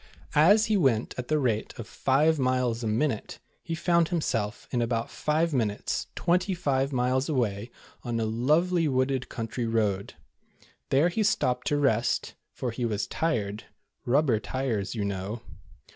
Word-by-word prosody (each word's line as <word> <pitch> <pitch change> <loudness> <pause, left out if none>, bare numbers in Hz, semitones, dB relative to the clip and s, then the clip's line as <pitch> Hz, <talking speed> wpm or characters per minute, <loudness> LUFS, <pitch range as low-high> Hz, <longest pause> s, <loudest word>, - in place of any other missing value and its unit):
As 200 +9 +6
he 215 -1 +2
went 130 - +1
at 125 -1 -5
the 155 - +2
rate 120 -7 -1
of 115 - -7
five 150 +4 +2
miles 125 -2 0
a - - -1
minute, 110 +1 -1 0.2
he 165 - -4
found 170 0 +2
himself 115 - -2
in 120 - 0
about 115 0 -1
five 155 +2 0
minutes 110 -6 -1
twenty 180 +2 +1
five 140 -5 0
miles 130 +2 +1
away 115 -6 -1 0.3
on 120 -2 -2
a 110 - 0
lovely 155 +10 +2
wooded 130 -1 0
country 115 +1 -3
road. 105 -4 -1 0.7
There 145 +6 +4
he 195 +6 -1
stopped 125 -11 +1
to 145 - +2
rest, 130 -5 +1 0.2
for 125 - -4
he 120 +2 -4
was 110 -3 -1
tired, 110 -10 -2 0.4
"rub 140 +6 +3
ber 115 -6 +2
tires," 110 -1 -2
you 105 -3 -1
know. 100 +3 -4
125 Hz, 160 wpm, -27 LUFS, 115-150 Hz, 0.7 s, As